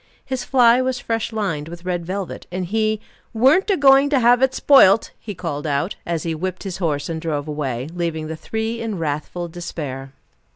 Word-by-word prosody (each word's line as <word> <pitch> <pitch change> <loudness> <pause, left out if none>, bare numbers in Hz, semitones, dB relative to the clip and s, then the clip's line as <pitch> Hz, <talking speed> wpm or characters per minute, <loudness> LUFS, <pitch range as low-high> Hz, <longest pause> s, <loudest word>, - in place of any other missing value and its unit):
His 260 -2 -3
fly 245 -1 +4
was 255 0 -1
fresh 225 -1 -2
lined 185 -9 -2
with 170 +1 -10
red 175 -2 -2
velvet, 190 0 -5
and 185 0 -3
he 215 +3 0 0.4
"weren't 280 - +4
a 395 - +3
going 275 0 +6
to 280 -2 +3
have 245 +1 +4
it 265 -1 +4
spoilt," 225 -7 +5
he 205 -3 -7
called 155 -4 -4
out, 145 +6 -1
as 170 -2 -2
he 165 - -2
whipped 185 +3 -4
his 190 -3 -5
horse 150 -6 -1
and 160 -1 -4
drove 150 -3 -3
away, 135 -4 -3
leaving 165 -3 -2
the 160 +1 -5
three 220 +6 -4
in 220 -4 -3
wrathful 160 +2 -3
despair. 150 -6 -6
180 Hz, 195 wpm, -21 LUFS, 160-230 Hz, 0.4 s, going